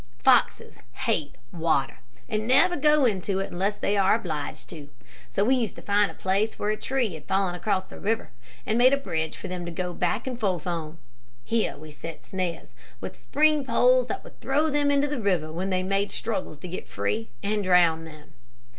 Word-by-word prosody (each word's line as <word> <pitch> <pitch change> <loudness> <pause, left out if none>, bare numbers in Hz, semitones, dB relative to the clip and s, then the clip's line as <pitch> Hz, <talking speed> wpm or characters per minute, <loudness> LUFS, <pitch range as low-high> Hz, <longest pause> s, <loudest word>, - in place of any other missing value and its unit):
Foxes 115 - +3 0.3
hate 145 -3 0 0.2
water, 160 -6 0 0.3
and 215 -1 -2
never 270 +8 +5
go 300 -1 +4
into 195 -3 0
it 195 - -3
unless 195 +4 0
they 205 - 0
are 195 0 +4
obliged 160 -10 -4
to, 150 -4 -9 0.4
so 200 - +1
we 255 - +4
used 240 -5 0
to - - -10
find 205 0 +3
a - - -10
place 200 +4 0
where 210 - 0
a - - 0
tree 245 -3 -1
had 155 -2 -9
fallen 190 -2 +1
across 185 +1 -1
a - - -9
river, 225 +3 -1 0.3
and 220 +2 +1
made 255 +2 +6
a - - +4
bridge 160 - -3
for - - -7
them 180 -1 -4
to 170 - -5
go 180 +1 -3
back 180 +6 -1
and 250 -2 -4
forth 185 -8 -1
on. 165 -2 -4 0.5
Here 225 - 0
we 155 +1 -11
set 165 +2 -9
snares, 185 -3 -4 0.3
with - - -6
spring 305 0 +2
poles - - +4
that - - -4
would - - -15
throw 295 +3 +1
them 290 0 +2
into 285 0 +3
the 290 -4 -3
river 180 -6 0
when 180 +4 -3
they 185 -1 0
made 195 +1 0
struggles 195 -9 -3
to 165 - -8
get 180 - -6
free, 100 +3 -2
and 210 0 0
drown 170 -3 +4
them. 155 -1 -13
195 Hz, 205 wpm, -26 LUFS, 170-230 Hz, 0.5 s, made